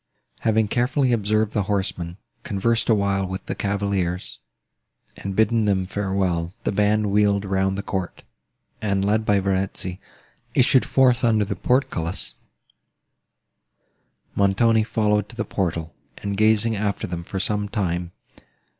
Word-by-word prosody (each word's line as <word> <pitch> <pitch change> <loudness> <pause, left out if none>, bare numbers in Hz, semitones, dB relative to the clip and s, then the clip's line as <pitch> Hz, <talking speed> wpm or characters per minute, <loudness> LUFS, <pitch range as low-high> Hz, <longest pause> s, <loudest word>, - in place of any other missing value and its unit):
Having 110 -1 +1
carefully 125 +2 +1
observed 110 -1 +1
the 105 - 0
horsemen, 90 -3 -2 0.2
conversed 115 +4 0
awhile 100 -3 +2
with 95 +1 -6
the - - -3
cavaliers, 100 -3 -2 0.8
and 100 -1 -5
bidden 110 +1 +3
them 95 -2 +1
farewell, 95 -3 -1
the - - 0
band 105 0 +2
wheeled 100 -1 +2
round 95 0 0
the 100 - -3
court, 95 -3 -4 0.6
and, 100 -2 0
led 110 +2 +1
by 100 -1 +4
Verezzi, 95 -1 -2 0.6
issued 130 0 +4
forth 130 -2 +3
under 110 -3 +3
the 100 - -3
portcullis; 85 - -1 2.0
Montoni 110 +3 +3
following 105 -2 +1
to 115 - -14
the - - -2
portal, 85 -4 -2 0.2
and 100 0 -3
gazing 110 +2 +3
after 100 0 -1
them 85 -1 -5
for 95 +3 -5
some 105 +1 0
time. 90 -5 -2
100 Hz, 130 wpm, -23 LUFS, 95-110 Hz, 2.0 s, by